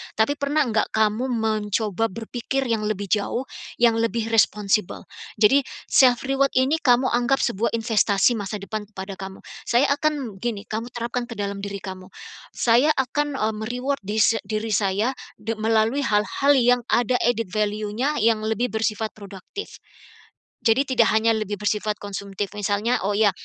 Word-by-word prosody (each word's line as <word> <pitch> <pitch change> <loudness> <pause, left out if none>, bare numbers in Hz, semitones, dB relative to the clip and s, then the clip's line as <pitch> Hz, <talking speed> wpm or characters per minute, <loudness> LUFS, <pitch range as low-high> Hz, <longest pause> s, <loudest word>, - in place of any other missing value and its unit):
Tapi 285 +7 +1
pernah 290 +2 +1
enggak 225 -4 0
kamu 220 +3 +1
mencoba 220 -2 0
berpikir 235 +5 -3
yang 215 -2 0
lebih 200 -2 -3
jauh, 215 +4 0 0.3
yang 230 -1 +3
lebih 230 0 -1
responsible? 210 -2 +1 0.3
Jadi 225 +6 +5 0.3
self 250 -2 +5
reward 270 0 +1
ini 270 +5 +2
kamu 255 -1 +3
anggap 245 +3 +1
sebuah 235 0 0
investasi 225 -1 +2
masa 205 +1 -4
depan 205 +1 -5
kepada 195 -2 -8
kamu. 190 0 -8 0.2
Saya 260 +4 +3
akan 280 -8 -1
gini, 215 -2 -3
kamu 225 +2 -4
terapkan 240 0 -3
ke 235 - -8
dalam 200 0 -2
diri 200 -1 -4
kamu, 185 -1 -8 0.5
"Saya 245 +6 +3
akan 290 +2 -1
eee 215 +1 0
me-reward 250 +6 -2
dise 215 +2 +2
diri 215 +2 -3
saya, 210 +4 +1 0.2
de 225 +1 -4
melalui 225 +5 +1
hal-hal 215 +7 +2
yang 245 -1 +4
ada 245 +1 +2
added 230 -4 0
value-nya, 215 +7 -1
yang 220 -1 +3
lebih 225 +3 0
bersifat 220 0 -1
produktif, 200 - -9 0.9
jadi 225 +4 +4
tidak 245 -4 +3
hanya 220 +1 +3
lebih 215 -1 -2
bersifat 210 +1 -1
konsumtif 200 0 -5
misalnya, 205 +4 0
oh - - +1
ya 210 -2 +5
225 Hz, 155 wpm, -23 LUFS, 210-245 Hz, 0.9 s, Jadi